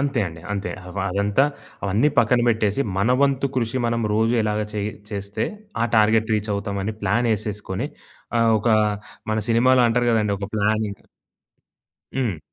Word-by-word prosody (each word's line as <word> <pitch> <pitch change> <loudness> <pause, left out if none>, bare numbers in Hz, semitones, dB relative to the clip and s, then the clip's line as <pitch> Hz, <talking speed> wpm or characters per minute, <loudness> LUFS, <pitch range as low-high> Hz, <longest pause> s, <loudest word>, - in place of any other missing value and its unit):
అంతే 140 -3 0
అండి. 80 -1 -8
అంతే. 100 -3 -3 0.3
వ - - -1
అదంతా 100 +6 +2 0.4
అవన్నీ 105 +9 +3
పక్కన 120 +2 +4
బెట్టేసి, 110 0 +1 0.2
మన 105 +5 +2
వంతు 140 -1 +2
కృషి 120 0 0
మనం 115 0 0
రోజు 115 +2 +2
ఎలాగ 105 0 0
చేయ్ 105 0 -2 0.2
చేస్తే, 100 0 -3 0.4
ఆ - - +4
టార్గెట్ 110 +1 +3
రీచ్ 105 0 -2
అవుతామని 100 +1 -3
ప్లానేసేసుకొని, 105 -2 -1 0.5
ఆహ్, 115 0 +4
ఒక 105 - -1 0.6
మన 110 - +1
సినిమాలో 125 +2 +4
అంటారు 120 +1 +1
గదండీ! 105 -3 +2
ఒక 100 0 -5
ప్లానింగ్ 105 0 0 1.2
హ్మ్. 115 -10 -1
110 Hz, 145 wpm, -23 LUFS, 100-115 Hz, 1.2 s, పక్కన